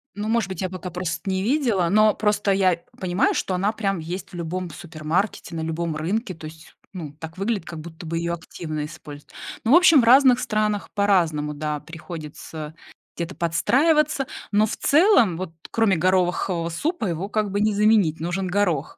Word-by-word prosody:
Ну, 205 +1 -4
может 225 -3 +1
быть, 190 -3 -5
я 185 - -1
пока 185 -1 -6
просто 180 +2 -4
не 190 0 0
видела, 230 - +1
но 215 +2 +5
просто 210 -1 +1
я 185 -3 +2 0.2
понимаю, 185 +1 +1
что 185 - -1
она 195 +4 +1
прям 195 -4 -2
есть 175 +4 -6
в - - -10
любом 175 +1 -4
супермаркете, 165 +4 -3
на 160 - -3
любом 160 0 -2
рынке, 185 +7 -2
то 160 -2 -11
есть, 160 +1 -14 0.2
ну, 155 -6 -7
так 160 +1 -9
выглядит, 200 -2 -1
как 165 -2 -7
будто 165 +1 -10
бы 165 +1 -3
её 170 0 -1
активно 155 -2 -5
используют. 150 -2 -11 0.3
Ну, 230 - +1
в - - +8
общем, 335 -5 +7
в - - -2
разных 255 +1 +6
странах 215 -1 -1
по-разному, 170 -8 +1
да, 150 0 -3
приходится 155 -1 -8 0.4
где-то 170 +2 -5
подстраиваться, 270 - +2 0.2
но 210 +1 +4
в 220 - -3
целом, 285 - +4
вот 180 -2 -5 0.2
кроме 225 -5 +3
горохового 180 -1 +1
супа, 295 - -2
его 180 +2 -3
как 210 -1 0
бы 200 - -1
не 215 0 +2
заменить, 205 -6 +3
нужен 175 +3 -2
горох. 180 -6 0
185 Hz, 185 wpm, -23 LUFS, 165-210 Hz, 0.4 s, в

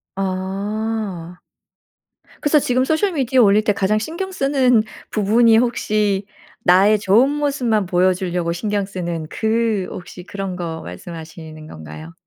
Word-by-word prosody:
아. 195 -1 -3 1.0
그래서 295 0 +4
지금 255 -1 +1
소셜 340 +6 +1
미디어 260 -3 +2
올릴 210 -1 +4
때 210 -1 +2
가장 200 +2 +1
신경 340 - -4
쓰는 265 -7 +2 0.3
부분이 220 +2 +4
혹시 210 -4 0 0.4
나의 200 +4 +5
좋은 215 +7 +4
모습만 275 -8 0
보여 185 +1 +2
주려고 180 -2 -2
신경 205 +3 -2
쓰는 175 -4 -4
그 220 -3 0
혹시 180 0 -9
그런 195 -1 -5
거 165 -2 -5
말씀하시는 160 - -9
건가요? 80 - -10
200 Hz, 270 characters per minute, -20 LUFS, 180-230 Hz, 1.0 s, 나의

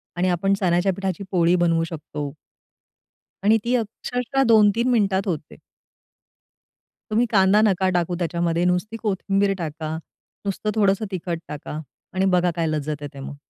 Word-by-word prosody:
आणि 180 +1 +1
आपण 180 +3 +1
चण्याच्या 180 +1 +2
पिठाची 190 0 -3
पोळी 175 -1 +3
बनवू 165 -2 +2
शकतो. 150 -3 -5 1.1
आणि 215 +2 +5
ती 245 +2 +1
अक्षरशः 245 +3 -1
2-3 220 +3 +4
मिनिटात 200 -4 +2
होते. 160 -5 -4 1.5
तुम्ही 230 +3 +3
कांदा 195 0 +5
नका 190 -3 +3
टाकू 175 0 0
त्याच्यामध्ये 170 0 0
नुसती 180 +5 0
कोथिंबीर 195 -1 +1
टाका, 160 -2 -4 0.5
नुसतं 200 +2 -2
थोडंसं 200 0 +2
तिखट 175 -2 -3
टाका 150 +1 -6 0.3
आणि 190 0 +1
बघा 175 0 +2
काय 165 -2 0
लज्जत 150 -1 -2
येते 140 -1 -8
मग. 135 +1 -7
185 Hz, 140 wpm, -23 LUFS, 165-200 Hz, 1.5 s, आणि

